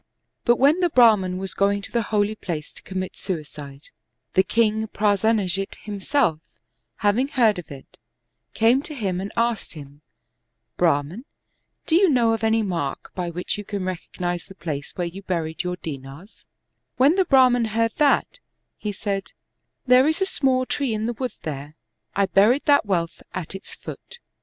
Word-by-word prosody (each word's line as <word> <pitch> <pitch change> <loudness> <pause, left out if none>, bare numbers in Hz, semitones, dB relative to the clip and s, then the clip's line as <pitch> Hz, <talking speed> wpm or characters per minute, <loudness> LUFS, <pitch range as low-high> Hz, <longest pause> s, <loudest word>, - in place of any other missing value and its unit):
But 240 - +5
when 285 +8 +4
the 355 -1 +2
Brahman 215 - +4
was 190 0 -5
going 200 0 +1
to - - -7
the 235 - +1
holy 210 0 +1
place 165 -7 -5
to - - -14
commit 185 -1 -5
suicide, 150 -5 -7 0.4
the 190 - +5
king 220 +1 +1
Prasenajit 205 -2 +1
himself, 205 - 0 0.7
having 225 +6 +3
heard 230 -9 +3
of 175 - -10
it, 135 -2 -12 0.6
came 235 +4 +4
to 300 +1 -8
him 190 -7 -2
and 195 - -5
asked 230 -2 0
him, 145 -2 -12 0.4
" - - -54
Brahman, 150 - 0 0.6
do - - -2
you 370 +2 +6
know 235 -5 +3
of 225 -1 -3
any 220 0 +3
mark 165 -8 -3
by 180 -2 -3
which 180 +4 -3
you - - -5
can 200 -2 -4
recognize 175 -1 -4
the 190 - -14
place 150 -6 -5
where 175 - -2
you 175 +3 -7
buried 165 -4 -2
your 180 0 -3
dinars} 145 +4 -9 0.5
When 275 +5 +5
the 380 0 +2
Brah 260 -4 +6
man 240 -1 +2
heard 225 +1 0
that, 300 - +2 0.4
he 210 - -3
said, 195 -1 -4 0.3
" - - -54
There 255 +2 +6
is 315 +1 +1
a 385 - +2
small 260 -7 +1
tree 255 -4 -1
in 215 +1 -2
the 240 - -1
wood 250 +2 -4
there, 145 0 -6 0.4
I 200 - +3
buried 210 +8 +3
that 285 -6 +4
wealth 170 -4 -1
at 180 -1 -5
its 195 - -8
foot." 480 - -10
205 Hz, 175 wpm, -23 LUFS, 180-240 Hz, 0.7 s, you